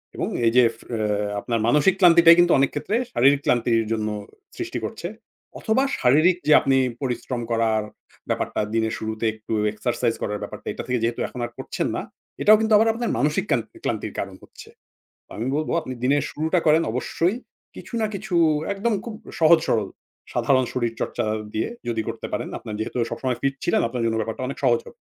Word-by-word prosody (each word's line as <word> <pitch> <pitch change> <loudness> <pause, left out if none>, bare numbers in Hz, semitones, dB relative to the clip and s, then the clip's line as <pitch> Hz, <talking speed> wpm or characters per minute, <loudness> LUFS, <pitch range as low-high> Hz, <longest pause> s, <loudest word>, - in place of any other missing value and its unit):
এবং - - -2 0.2
এই 115 - +4
যে 125 - +8 0.8
আপনার 115 +2 -2
ফে - - -1
মানসিক 150 +9 +4
ক্লান্তিটাই 170 -2 +8
কিন্তু 175 0 +5
অনেক 135 - +3
ক্ষেত্রে 210 - -2 0.2
শারীরিক 140 +3 +4
ক্লান্তির 115 -2 +2
জন্য 110 -1 -1 0.5
সৃষ্টি - - -4
করছে। 170 - -5 0.5
অথবা 230 +5 +1 0.2
শারীরিক 155 +8 +4
যে 150 - +7
আপনি 135 -1 +2 0.2
পরিশ্রম 125 -1 -3
করার 115 -1 +2 0.5
ব্যাপারটা - - -1
দিনের 110 -1 0
শুরুতে 110 +1 -4
একটু 110 +1 -7 0.2
এক্সারসাইজ 120 +2 -1
করার 105 0 -2
ব্যাপারটা - - -9
এটা - - -6
থেকে 125 -1 0
যেহেতু 115 +1 -1
এখন 125 - -9
আর 120 - -8
করছেন - - -3
না, - - -2 0.4
এটাও 215 +1 +7
কিন্তু 220 0 +2
আবার 220 +2 +4
আপনার 235 +1 -2
মানসিক 150 +5 +1
কান্তি 115 -2 -1
ক্লান্তির 110 -2 -3
কারণ 100 -1 -4
হচ্ছে। - - -14 0.7
আমি 115 - -3
বলব 155 0 -2
আপনি 140 -5 -7
দিনের 140 +3 +3
শুরুটা 160 +4 0
করেন 155 +1 +5
অবশ্যই 170 - 0 0.4
কিছু - - -11
না 220 - +2
কিছু 195 -1 -5 0.4
একদম 210 +4 -1
খুব 230 - -6 0.3
সহজ 165 +1 +7
সরল 110 -4 +1 0.4
সাধারণ 130 -2 +2
শরীরচর্চা 120 -3 -2 0.3
দিয়ে 110 - -1 0.2
যদি 115 -1 -1
করতে - - -5
পারেন, - - -2
আপনার 105 - -7
যেহেতু 110 - -4
সবসময় 130 -2 -2
ফিট 135 0 +1
ছিলেন - - +2
আপনার 120 0 -3
জন্য 115 -1 0
ব্যাপারটা 110 +3 -3
অনেক 140 - -6
সহজ 120 -2 +4
হবে। - - -14
125 Hz, 180 wpm, -23 LUFS, 115-165 Hz, 0.8 s, যে